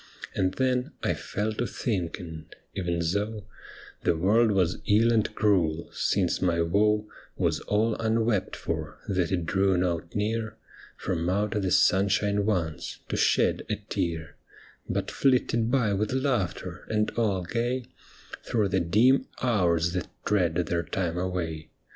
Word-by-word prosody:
And 95 0 0
then 125 -1 0
I - - +2
fell 105 +2 -3
to 120 +3 -2
thinking, 85 -6 -3 0.3
even 85 -3 -1
so 100 +5 -2 0.6
The 85 - +2
world 110 +7 +4
was 95 -4 +1
ill 115 +3 +4
and 110 -2 +2
cruel, 85 -6 +1
since 95 -4 +1
my 85 -2 +2
woe 105 +5 +2 0.3
Was - - +1
all 110 +2 +1
unwept 110 -2 +1
for, - - -4
that 90 -3 0
it 85 -3 0
drew 95 +1 +2
not 85 -2 -1
near 110 +1 -1 0.4
From 85 -2 -2
out 100 +2 0
the 100 -4 0
sunshine 100 +2 +3
once, 85 -7 -2
to - - -1
shed - - +2
a - - +1
tear, 80 -2 -4 0.5
But - - -1
flitted 120 -3 +2
by 120 -6 +2
with 105 +4 -1
laughter, 130 - -2
and 105 -1 +1
all 100 -6 0
gay, 120 +6 -1 0.6
Through 105 -4 0
the 95 - +2
dim 110 +11 +3 0.2
hours 85 -8 +2
that 90 -2 -2 0.2
tread 90 -6 +2
their 85 0 0
time 85 0 -2
away. 85 -4 -3
100 Hz, 140 wpm, -27 LUFS, 85-110 Hz, 0.6 s, world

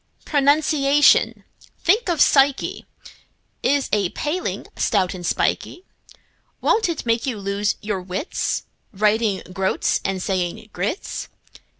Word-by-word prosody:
Pronunciation—think 295 - +2
of 335 -3 +1
psyche!— 275 -1 +3 0.7
Is 285 -1 +1
a 200 -4 +2
paling, 315 - -3
stout 190 -4 +1
and 180 -2 -8
spikey; 355 - -1 0.7
Won't 440 -4 +2
it 330 - -3
make 230 +3 0
you 245 -5 -2
lose 200 +1 -1
your 205 -3 -2
wits, 185 - -3 0.3
Writing 210 0 +1
"groats" 190 0 0
and 195 -1 -2
saying 185 +3 -2
groats? 200 - -3
220 Hz, 105 wpm, -22 LUFS, 195-295 Hz, 0.7 s, psyche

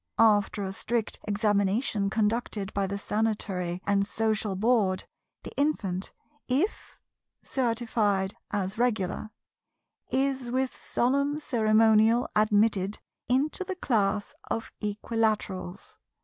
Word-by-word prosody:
After 205 -2 +4
a 190 0 -3
strict 225 +2 -2
examination 205 0 +1
conducted 215 -1 -1
by 200 -1 0
the 200 +1 -3
Sanitary 195 -4 -2
and 200 0 +2
Social 215 -2 0
Board, 205 -3 +2 0.4
the - - -7
infant, 200 -11 0 0.4
if 290 - -1 0.5
certified 225 -6 0
as 200 +1 -2
Regular, 215 -3 0 0.8
is 265 -2 0
with 260 +1 -1
solemn 280 +4 0
ceremonial 220 -2 +4
admitted 210 -2 +2 0.3
into 280 +8 +1
the 380 0 -4
class 210 - 0 0.2
of 225 - -3
Equilaterals. 210 -3 -2
215 Hz, 100 wpm, -28 LUFS, 200-240 Hz, 0.8 s, After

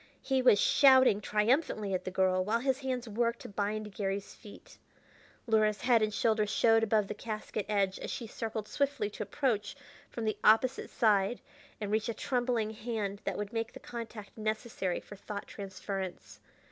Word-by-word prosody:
He 265 -1 +1
was 230 -5 +6
shouting 260 -6 +6
triumphantly 210 -1 +1
at 185 - -2
the - - -2
girl, 185 0 +2
while 225 +4 0
his 265 0 +1
hands 255 -3 -3
worked 235 +2 -1
to - - -8
bind 210 +1 -3
Garry's 195 0 -3
feet. 205 - -14 0.7
Luhra's 215 -2 +2
head 240 -3 +4
and 215 0 +1
shoulders 215 -1 +1
showed 225 +1 +4
above 215 -2 +2
the - - -4
casket 215 -1 -5
edge 195 -2 +1
as - - -6
she 235 - -4
circled 220 -1 -5
swiftly 280 -7 -1
to - - -8
approach 210 0 -1 0.3
from 230 - -5
the 215 - -1
opposite 235 +4 +4
side 210 -1 +2 0.4
and 210 -2 -3
reach 220 +1 0
a 230 - -2
trembling 245 -4 0
hand 215 -3 -4
that - - -2
would 210 +2 -4
make 225 0 -2
the - - -9
contact 230 -3 -8
necessary 215 -4 -2
for 205 - -12
thought 205 +1 -6
transference. 190 -1 -6
215 Hz, 170 wpm, -31 LUFS, 205-235 Hz, 0.7 s, was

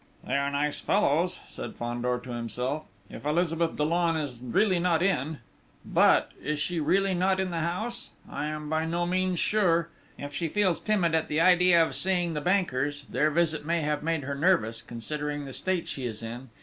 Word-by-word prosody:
"They - - -2
are 140 0 +1
nice 145 +1 -1
fellows," 180 -2 +1
said - - -7
Fandor 120 +1 -2
to 125 - -8
himself. 125 +5 -3 0.2
"If 115 - -10
Elizabeth 165 +2 0
Dollon 165 +2 +1
is 145 -6 -3
really 185 - +2
not 170 -1 +2
in!... 160 -5 0 0.5
but... - - +4
Is 150 0 -2
she 170 +2 -1
really 195 +5 +2
not 185 +1 +2
in 190 -1 -1
the 170 - -2
house? 215 +9 -3 0.2
I 150 - -4
am 150 0 -5
by 160 +1 0
no 170 +1 0
means 185 0 0
sure.... 170 -4 +2 0.3
If 145 0 -7
she 165 +3 -1
feels 185 0 +2
timid 190 -6 +1
at 160 -1 +1
the 150 - 0
idea 175 -1 +6
of - - -6
seeing 175 -2 0
the 150 - -2
bankers 145 -6 0
their 155 - +2
visit 155 -1 +1
may 165 +2 0
have 150 -1 -1
made 160 -2 -1
her 140 +1 -3
nervous, 140 - +2
considering 145 +5 -4
the 135 - -8
state 185 +2 -1
she 130 -3 -3
is 110 -1 -7
in 120 +3 -7
160 Hz, 190 wpm, -28 LUFS, 145-180 Hz, 0.5 s, idea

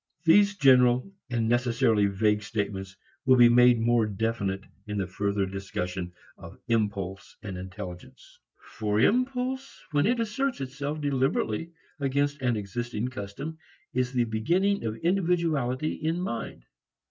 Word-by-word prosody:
These 200 +4 +5
general 125 +3 +4 0.2
and 115 -2 0
necessarily 115 -3 +2
vague 105 +1 +1
statements 100 -3 -4 0.3
will 130 -2 +5
be 120 -1 +7
made 120 0 +6
more 115 -1 +3
definite 100 -2 -2 0.2
in 105 0 -3
the 95 - 0
further 100 +1 -1
discussion 95 -2 -4 0.3
of - - -11
impulse 100 -4 -2
and 95 -2 -5
intelligence. 90 -1 -9 0.2
For 105 0 -2
impulse 255 - 0
when 145 +4 +2
it 240 +1 +1
asserts 245 +4 -1
itself 140 +3 -4
deliberately 140 +1 0 0.3
against 140 +1 0
an 125 -2 +1
existing 120 +3 -3
custom 130 +8 -7 0.3
is 125 0 0
the 125 -2 +2
beginning 170 - +1
of 110 0 -3
individuality 165 -7 +1
in 160 +2 -2
mind. 115 - -4
120 Hz, 130 wpm, -27 LUFS, 105-150 Hz, 0.3 s, be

